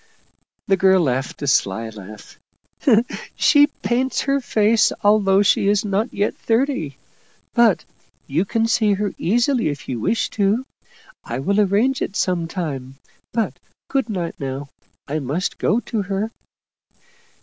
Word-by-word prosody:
The 195 - +2
girl 190 +1 +5
laughed 135 -2 -1
a - - -2
sly 115 -3 +1
laugh. 105 -1 -12 0.5
" 240 -1 +1
She 290 -1 +5
paints 260 -2 -1
her 275 0 +1
face, 220 -2 +3
al 210 +1 +5
though 195 0 +3
she 195 - +3
is 205 +1 +2
not 205 +4 0
yet 205 +1 0
thirty. 225 - -1 0.6
But 220 -10 +3 0.4
you 155 +5 0
can 225 +3 0
see 220 -2 +2
her 205 0 -2
easily 240 - +1
if 145 -2 -6
you 125 -3 -3
wish 225 - 0
to. 215 +5 +1 0.6
I 120 - -4
will 195 +10 0
arrange 210 +7 +2
it 200 - -3
some 175 -4 0
time. 140 -7 -5 0.4
But 225 -1 -2 0.3
good 270 -4 0
night 180 -5 -4
now. 135 +1 -5 0.4
I 150 +2 -2
must 150 +7 -3
go 220 - +2
to 220 -3 -3
her." 200 +3 -2
200 Hz, 150 wpm, -21 LUFS, 150-225 Hz, 0.6 s, girl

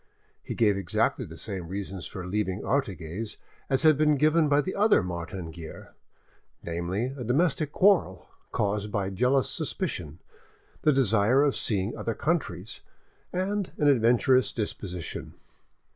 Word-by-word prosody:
He - - -6
gave 105 -4 +3
exactly 95 -3 0
the - - -11
same 90 -4 -5
reasons 95 0 -5
for 90 -3 -7
leaving 95 0 -2
Artigues 100 - -2 0.3
as 135 +2 +2
had 155 -2 +5
been 150 -1 +4
given 155 +2 +3
by 145 0 +4
the 185 - -4
other 210 - +4
Martin 85 -1 -5
Guerre, 80 -1 -10 0.7
namely, 90 +9 -2
a 130 - -6
domestic 150 +4 +1
quarrel 170 - +3 0.2
caused 105 0 -1
by 100 -2 -1
jealous 125 +7 +2
suspicion, 140 - -3 0.6
the 155 - +4
desire 125 0 +4
of 145 -2 +2
seeing 100 0 0
other 115 - -3
countries, 115 - -2 0.5
and 190 +2 -2
an 150 - +2
adventurous 125 -1 +4
disposition. 95 -5 -5
115 Hz, 135 wpm, -27 LUFS, 95-145 Hz, 0.7 s, had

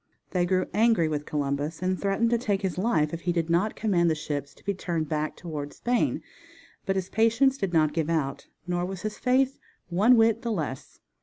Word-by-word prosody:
They 175 -1 +1
grew 185 0 +2
angry 220 -5 +3
with 150 -1 -3
Columbus, 145 +2 -2
and 185 0 0
threatened 205 +4 +1
to 235 - +2
take 205 -4 -1
his 185 -1 -2
life 175 -8 +1
if 170 - -4
he 175 - 0
did 170 -1 -1
not 185 +6 +1
command 180 -6 +2
the 160 - +1
ships 145 -2 -4
to - - -23
be 200 - 0
turned 170 -4 -2
back 155 0 -2
toward 150 -4 -6
Spain, 245 0 0 0.6
but 195 - +1
his 190 -1 -1
patience 230 +5 +3
did 195 -9 -2
not 155 -3 +3
give 160 -1 -1
out, 150 -5 -1 0.2
nor 175 0 -1
was 185 0 -5
his 215 0 -4
faith 260 +1 +2 0.3
one 210 +8 +5
whit 225 0 +4
the 235 - -2
less. 150 -9 -5
180 Hz, 210 wpm, -27 LUFS, 155-215 Hz, 0.6 s, one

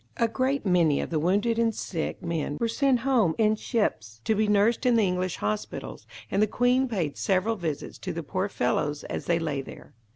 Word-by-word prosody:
A 230 - +3
great 260 +2 -1
many 170 -6 +3
of - - -4
the 160 - +1
wounded 205 +8 +1
and 225 -2 +2
sick 165 -4 -4
men 165 -4 -2
were 230 - +1
sent 255 +1 +2
home 230 -10 +2
in 215 -1 +3
ships, 115 - -2
to - - +2
be 215 0 +1
nursed 210 +4 +3
in 250 -2 +4
the 225 - +4
English 180 -1 -1
hospitals, 105 0 -4 0.2
and 200 - +2
the 215 - +4
Queen 250 +4 +2
paid 180 - -2
several 195 +4 +1
visits 160 -7 -5
to 185 - -4
the 170 -1 -5
poor 185 +6 -2
fellows 145 0 -1
as - - -5
they 170 - +2
lay 150 -4 -2
there. - - -12
195 Hz, 205 wpm, -27 LUFS, 165-230 Hz, 0.2 s, in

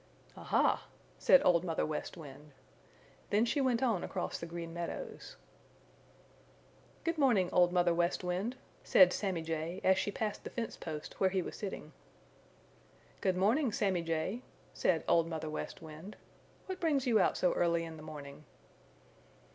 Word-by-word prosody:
"Aha!" - - +1 0.3
said 275 - +6
Old 170 -1 +4
Mother 165 -3 -1
West 155 +3 -4
Wind. 150 -1 -11 0.8
Then 210 +3 +3
she 260 +5 0
went 255 -2 +1
on 225 -8 +1
across - - -3
the 170 - -6
Green 165 0 -6
Meadows. 175 - -6 1.7
"Good 330 -1 -1
morning, 220 -10 +3
Old 175 -1 +5
Mother 175 -1 +3
West 175 +2 0
Wind," 185 +7 -2 0.3
said 185 -1 +6
Sammy 185 -5 -2
Jay 165 +3 -3
as 190 0 +4
she 205 - -1
passed 210 0 -3
the - - -6
fence 235 -2 -4
post 155 -2 -7
where 190 - +4
he 185 -1 0
was - - -7
sitting. 190 -6 -6 1.3
"Good 185 -1 +1
morning, 230 +8 +3
Sammy 195 -4 +1
Jay," 165 +8 -2 0.3
said - - +1
Old 165 -1 +4
Mother 160 -2 -4
West 155 - -6
Wind. 160 +6 -10 0.5
"What 375 -1 -5
brings 290 -5 +1
you 230 -4 +4
out - - +2
so 180 - +2
early 170 -1 +1
in 160 -1 -8
the - - -10
morning?" 150 -1 -9
180 Hz, 155 wpm, -33 LUFS, 165-215 Hz, 1.7 s, said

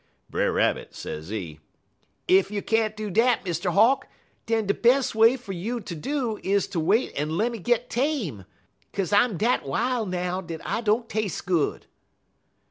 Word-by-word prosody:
"Brer - - +1
Rabbit, - - 0
sezee, 80 -1 -6 0.7
'Ef 190 +1 +4
you 205 -1 -3
can't 220 -1 +1
do 215 -2 -4
dat, 230 +3 +3
Mr. 175 0 -1
Hawk, 225 +9 +4 0.4
den 225 -1 +1
de 200 - +2
bes' 250 +4 +3
way 225 +3 +5
fer 230 -5 -9
you 210 +7 -3
ter 185 -5 -7
do 240 - -2
is 200 0 +1
ter 170 - -3
wait 200 +10 +2
en 155 +3 -2
lemme 230 +2 0
git 240 +4 +1
tame, 235 - -2 0.5
'kaze 195 0 -2
I'm 205 -1 +4
dat 230 +6 +1
wil' 230 - -1
now 180 0 -2
dat 165 -3 -7
I 230 - -1
don't 225 +1 +1
tas'e 215 -7 -3
good.' 175 -5 0
210 Hz, 165 wpm, -25 LUFS, 175-235 Hz, 0.7 s, way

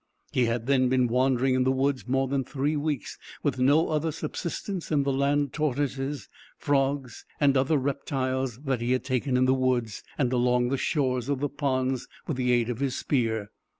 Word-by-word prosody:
He 125 - +2
had 115 0 -1
then 130 -1 +3
been 130 -1 +3
wandering 130 +1 +2
in 130 0 +2
the 130 - +2
woods, 135 -1 0
more 135 +1 +1
than 135 0 0
three 145 +4 -1
weeks, 145 -5 -3 0.2
with - - 0
no 145 +5 +4
other 155 +1 0
subsistence 175 +4 -4
than 145 -3 +2
the 140 0 0
land 140 +1 +1
tortoises, 140 -1 -2 0.3
frogs, 135 -3 0 0.2
and 140 -2 +4
other 135 +4 +3
reptiles 130 -2 -2
that 135 -4 -1
he 120 +2 +1
had 130 - 0
taken 130 0 0
in 130 - +4
the 130 - +4
woods, 125 -5 0 0.2
and 130 -3 +1
along 125 0 +2
the 135 - +1
shores 130 -4 0
of 140 -2 0
the 145 +1 -1
ponds, 130 -3 -1 0.2
with 155 -7 -3
the 125 -1 +1
aid 120 -2 +2
of 120 -1 -3
his 135 -2 -1
spear. 110 -6 -1
130 Hz, 190 wpm, -27 LUFS, 125-140 Hz, 0.3 s, no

